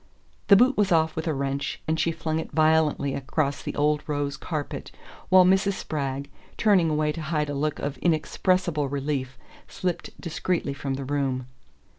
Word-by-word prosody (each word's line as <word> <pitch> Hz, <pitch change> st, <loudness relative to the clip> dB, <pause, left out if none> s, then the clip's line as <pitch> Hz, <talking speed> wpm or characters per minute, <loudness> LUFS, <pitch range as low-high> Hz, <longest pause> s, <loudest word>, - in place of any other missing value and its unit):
The 200 Hz, -, +8 dB
boot 255 Hz, +6 st, +4 dB
was 205 Hz, -2 st, +2 dB
off 160 Hz, -1 st, +3 dB
with 160 Hz, +1 st, -3 dB
a 160 Hz, -, +1 dB
wrench, 140 Hz, +1 st, -2 dB
and 160 Hz, 0 st, 0 dB
she 165 Hz, +2 st, +2 dB
flung 160 Hz, -1 st, -2 dB
it -, -, -5 dB
violently 155 Hz, -3 st, +2 dB
across 140 Hz, +1 st, -1 dB
the -, -, -5 dB
old 150 Hz, 0 st, +2 dB
rose 145 Hz, -2 st, -1 dB
carpet, 150 Hz, -1 st, -5 dB, 0.4 s
while 185 Hz, 0 st, +7 dB
Mrs. 190 Hz, +2 st, +3 dB
Spragg, 140 Hz, -6 st, -3 dB, 0.3 s
turning 195 Hz, -7 st, +4 dB
away 150 Hz, 0 st, +1 dB
to 165 Hz, -, -6 dB
hide 150 Hz, -1 st, -1 dB
a -, -, -3 dB
look 150 Hz, +1 st, -1 dB
of 140 Hz, -2 st, -4 dB
inexpressible 170 Hz, -2 st, +1 dB
relief, 135 Hz, -2 st, -3 dB, 0.3 s
slipped 180 Hz, -2 st, -4 dB
discreetly 170 Hz, -3 st, -2 dB
from 140 Hz, -1 st, -3 dB
the 135 Hz, 0 st, -5 dB
room. 135 Hz, -2 st, -1 dB
155 Hz, 170 wpm, -26 LUFS, 140-170 Hz, 0.4 s, The